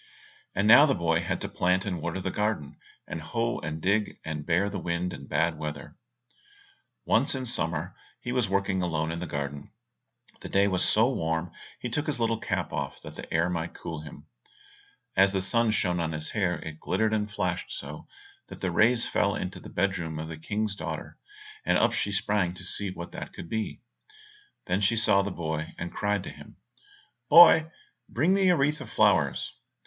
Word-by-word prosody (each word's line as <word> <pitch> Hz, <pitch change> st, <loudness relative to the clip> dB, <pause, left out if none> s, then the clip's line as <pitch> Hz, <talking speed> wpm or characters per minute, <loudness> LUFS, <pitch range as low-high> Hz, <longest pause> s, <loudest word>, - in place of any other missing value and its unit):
And 105 Hz, -, +2 dB
now 120 Hz, +7 st, +9 dB
the 135 Hz, -, +2 dB
boy 80 Hz, -1 st, +1 dB
had 85 Hz, -, -2 dB
to -, -, -3 dB
plant 90 Hz, +1 st, +1 dB
and 90 Hz, -5 st, -3 dB
water 85 Hz, +3 st, -3 dB
the 95 Hz, 0 st, -3 dB
garden, 105 Hz, -9 st, -2 dB, 0.3 s
hoe 115 Hz, +10 st, -2 dB
and 75 Hz, +1 st, -4 dB
dig, 100 Hz, +5 st, +1 dB
and 75 Hz, -2 st, -4 dB
bear 90 Hz, +4 st, +2 dB
the 100 Hz, -1 st, -4 dB
wind 85 Hz, +1 st, -2 dB
and 70 Hz, -, -10 dB
bad 80 Hz, -1 st, +1 dB
weather. 75 Hz, +1 st, -6 dB, 1.1 s
Once -, -, +2 dB
in 130 Hz, -1 st, -3 dB
summer 80 Hz, -9 st, 0 dB
when -, -, -25 dB, 0.3 s
he 120 Hz, -, -4 dB
was 125 Hz, -5 st, +1 dB
working 95 Hz, -1 st, +1 dB
alone 80 Hz, -2 st, -1 dB
in 85 Hz, -, -4 dB
the 90 Hz, -, -4 dB
garden, 70 Hz, 0 st, -4 dB, 0.7 s
the -, -, -8 dB
day 100 Hz, +1 st, +3 dB
was 95 Hz, -2 st, +1 dB
so 110 Hz, +2 st, +4 dB
warm 80 Hz, -2 st, -1 dB, 0.3 s
he -, -, -4 dB
took 145 Hz, +6 st, -2 dB
his 150 Hz, -5 st, -1 dB
little 115 Hz, -1 st, +1 dB
cap -, -, -2 dB
off -, -, -3 dB
that -, -, -9 dB
the -, -, -9 dB
air 80 Hz, +1 st, +2 dB
might 85 Hz, -1 st, -3 dB
cool 80 Hz, -2 st, -6 dB
him. 75 Hz, -1 st, -11 dB, 0.9 s
As 95 Hz, +1 st, +5 dB
the 95 Hz, -, +1 dB
sun 115 Hz, +4 st, +2 dB
shone 90 Hz, -5 st, +1 dB
on 80 Hz, -1 st, -1 dB
his 75 Hz, 0 st, -4 dB
hair 90 Hz, -5 st, +1 dB
it 80 Hz, -1 st, -8 dB
glittered 110 Hz, +4 st, 0 dB
and 105 Hz, -1 st, 0 dB
flashed 105 Hz, -, -2 dB
so -, -, -7 dB, 0.4 s
that -, -, -10 dB
the 95 Hz, -, -1 dB
rays 115 Hz, +7 st, +4 dB
fell -, -, +1 dB
into -, -, -4 dB
the -, -, -11 dB
bed 95 Hz, +1 st, 0 dB
room 80 Hz, -2 st, -4 dB
of 80 Hz, +1 st, -5 dB
the 80 Hz, -, -6 dB
King's 105 Hz, +4 st, -2 dB
daughter, -, -, -6 dB, 0.4 s
and -, -, +3 dB
up -, -, +3 dB
she 100 Hz, -, -1 dB
sprang 100 Hz, -3 st, +1 dB
to 90 Hz, -, -9 dB
see 100 Hz, +2 st, -1 dB
what 85 Hz, -2 st, -7 dB
that -, -, -7 dB
could -, -, -8 dB
be. 110 Hz, -1 st, -3 dB, 0.8 s
Then 90 Hz, +3 st, 0 dB
she 105 Hz, +3 st, +2 dB
saw 100 Hz, -3 st, +4 dB
the 100 Hz, -, -2 dB
boy, 80 Hz, -3 st, -4 dB
and 85 Hz, +1 st, -5 dB
cried 105 Hz, -2 st, 0 dB
to -, -, -6 dB
him, -, -, -13 dB, 0.7 s
"Boy, 160 Hz, -2 st, +9 dB, 0.4 s
bring 155 Hz, +10 st, +2 dB
me 195 Hz, -1 st, +4 dB
a 175 Hz, -, +4 dB
wreath 150 Hz, +2 st, +1 dB
of 125 Hz, -, -8 dB
flowers." 95 Hz, -, +2 dB
95 Hz, 200 wpm, -28 LUFS, 80-110 Hz, 1.1 s, now